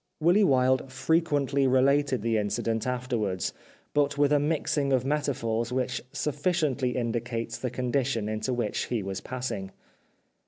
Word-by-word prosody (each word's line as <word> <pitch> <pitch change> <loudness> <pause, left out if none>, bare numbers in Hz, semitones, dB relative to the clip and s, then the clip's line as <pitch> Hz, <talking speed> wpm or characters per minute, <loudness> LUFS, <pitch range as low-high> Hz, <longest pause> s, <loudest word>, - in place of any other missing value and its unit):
Willy 175 +6 +4
Wilde 130 -4 +3
frequently 140 -1 +1
related 130 -1 +3
the 115 -1 +1
incident 110 +2 -1
afterwards, 120 -7 -1 0.4
but 145 -1 +2
with 145 0 +3
a 145 - +5
mixing 145 -1 0
of 130 -1 +2
metaphors 125 -6 -1
which 130 0 -1
sufhciently 145 -4 0
indicates 120 -1 -2
the 125 - -2
condition 125 -2 -1
into 110 +3 -2
which 120 -4 -1
he 115 -5 -2
was 95 0 -4
passing. 120 -6 -4
130 Hz, 130 wpm, -27 LUFS, 115-140 Hz, 0.4 s, a